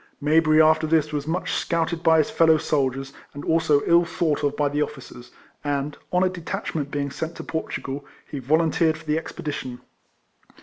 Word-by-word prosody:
Mayberry 155 Hz, +1 st, +4 dB
after 155 Hz, 0 st, +4 dB
this 155 Hz, -1 st, +1 dB
was 145 Hz, 0 st, -3 dB
much 175 Hz, +3 st, -2 dB
scouted 165 Hz, 0 st, -1 dB
by 160 Hz, -1 st, +5 dB
his 155 Hz, -, +2 dB
fellow 160 Hz, -1 st, +5 dB
soldiers, 135 Hz, -2 st, -1 dB, 0.2 s
and 145 Hz, -, -7 dB
also 155 Hz, -3 st, +3 dB
ill 170 Hz, +1 st, +5 dB
thought 160 Hz, -3 st, -1 dB
of 145 Hz, 0 st, 0 dB
by 145 Hz, -, +2 dB
the 145 Hz, +1 st, -1 dB
officers; 130 Hz, -4 st, -6 dB, 0.3 s
and, 145 Hz, 0 st, -2 dB, 0.2 s
on 180 Hz, +1 st, +3 dB
a -, -, +4 dB
detachment 165 Hz, -4 st, -4 dB
being 140 Hz, -1 st, -3 dB
sent 160 Hz, +4 st, -5 dB
to -, -, -7 dB
Portugal, 145 Hz, -3 st, -4 dB, 0.2 s
he 145 Hz, -, -5 dB
volunteered 160 Hz, +3 st, +2 dB
for 160 Hz, -, -15 dB
the 155 Hz, +1 st, +1 dB
ex -, -, -9 dB
pedition. 130 Hz, -5 st, -5 dB
155 Hz, 180 wpm, -24 LUFS, 145-160 Hz, 0.3 s, by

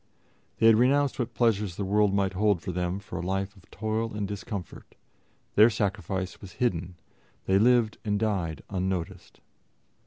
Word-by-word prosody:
They 110 Hz, -, +2 dB
had 115 Hz, -1 st, +7 dB
renounced 135 Hz, +4 st, +3 dB
what 120 Hz, -, -3 dB
pleasures 105 Hz, -6 st, +1 dB
the 100 Hz, -, -3 dB
world 105 Hz, +1 st, +3 dB
might 100 Hz, -1 st, +1 dB
hold 100 Hz, -1 st, +2 dB
for 90 Hz, -, -5 dB
them 90 Hz, +1 st, -2 dB
for 100 Hz, -3 st, -7 dB
a -, -, -4 dB
life 95 Hz, +2 st, -2 dB
of 95 Hz, -, -20 dB
toil 110 Hz, +1 st, -2 dB
and 105 Hz, -1 st, -2 dB
discomfort; 100 Hz, -2 st, -7 dB, 0.6 s
their 110 Hz, +3 st, +7 dB
sacrifice 95 Hz, -3 st, -3 dB
was 95 Hz, -2 st, -10 dB
hidden; 90 Hz, -7 st, -1 dB, 0.5 s
they 95 Hz, +1 st, +3 dB
lived 120 Hz, -1 st, +3 dB
and 105 Hz, -2 st, 0 dB
died 90 Hz, -9 st, -1 dB
unnoticed. 95 Hz, -3 st, -4 dB
100 Hz, 160 wpm, -27 LUFS, 95-110 Hz, 0.6 s, had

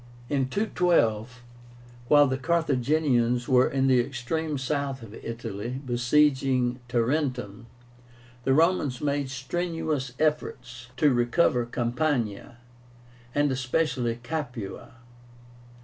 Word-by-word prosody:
In 135 Hz, -2 st, 0 dB
212, 125 Hz, -, +1 dB, 0.6 s
while 145 Hz, +2 st, +6 dB
the 130 Hz, -1 st, -1 dB
Carthaginians 135 Hz, -5 st, +1 dB
were 125 Hz, -1 st, +4 dB
in 135 Hz, 0 st, +1 dB
the 130 Hz, -2 st, +4 dB
extreme 140 Hz, +5 st, -2 dB
south 135 Hz, -1 st, -2 dB
of 105 Hz, -2 st, -11 dB
Italy, 115 Hz, +1 st, -5 dB
besieging 130 Hz, 0 st, +2 dB
Tarentum, 120 Hz, -3 st, -1 dB, 0.8 s
the 135 Hz, +1 st, +2 dB
Romans 160 Hz, -5 st, +2 dB
made 145 Hz, -2 st, -1 dB
strenuous 155 Hz, -1 st, -3 dB
efforts 125 Hz, -6 st, -2 dB
to 145 Hz, 0 st, +4 dB
recover 120 Hz, 0 st, +2 dB
Campania, 120 Hz, -3 st, -2 dB, 0.8 s
and 145 Hz, -1 st, +2 dB
especially 125 Hz, -2 st, 0 dB
Capua. 120 Hz, -9 st, -5 dB
130 Hz, 95 wpm, -26 LUFS, 120-150 Hz, 0.8 s, while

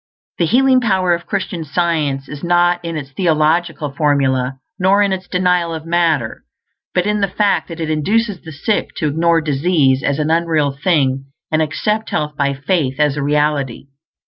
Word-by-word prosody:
The 170 Hz, -, +2 dB
healing 260 Hz, +4 st, +4 dB
power 190 Hz, -6 st, +2 dB
of 170 Hz, 0 st, -4 dB
Christian 190 Hz, -4 st, -3 dB
Science 150 Hz, -3 st, -1 dB
is 145 Hz, -1 st, -9 dB
not 175 Hz, 0 st, +2 dB
in 165 Hz, -1 st, -4 dB
its 140 Hz, -2 st, -7 dB
theological 160 Hz, -1 st, 0 dB
formulæ, 135 Hz, -3 st, +1 dB, 0.2 s
nor 195 Hz, +2 st, +4 dB
in 200 Hz, -1 st, +1 dB
its 185 Hz, -1 st, -5 dB
denial 180 Hz, -2 st, +1 dB
of 160 Hz, 0 st, -7 dB
matter; 165 Hz, -8 st, 0 dB, 0.5 s
but 180 Hz, -, +2 dB
in 210 Hz, 0 st, 0 dB
the 200 Hz, -, +2 dB
fact 200 Hz, +2 st, 0 dB
that 165 Hz, -1 st, -8 dB
it 160 Hz, -1 st, -2 dB
induces 205 Hz, +6 st, 0 dB
the 160 Hz, -, -10 dB
sick 205 Hz, +8 st, -2 dB
to 155 Hz, -, -1 dB
ignore 165 Hz, +2 st, +2 dB
disease 145 Hz, -2 st, +2 dB
as 140 Hz, +1 st, 0 dB
an 155 Hz, +1 st, 0 dB
unreal 165 Hz, -3 st, +1 dB
thing 135 Hz, -3 st, 0 dB, 0.3 s
and 155 Hz, 0 st, +2 dB
accept 210 Hz, +8 st, -1 dB
health 150 Hz, -1 st, -2 dB
by 140 Hz, -1 st, 0 dB
faith 140 Hz, -1 st, -1 dB
as 150 Hz, -2 st, +2 dB
a 145 Hz, -, -3 dB
reality. 145 Hz, -2 st, -1 dB
160 Hz, 175 wpm, -17 LUFS, 145-180 Hz, 0.5 s, healing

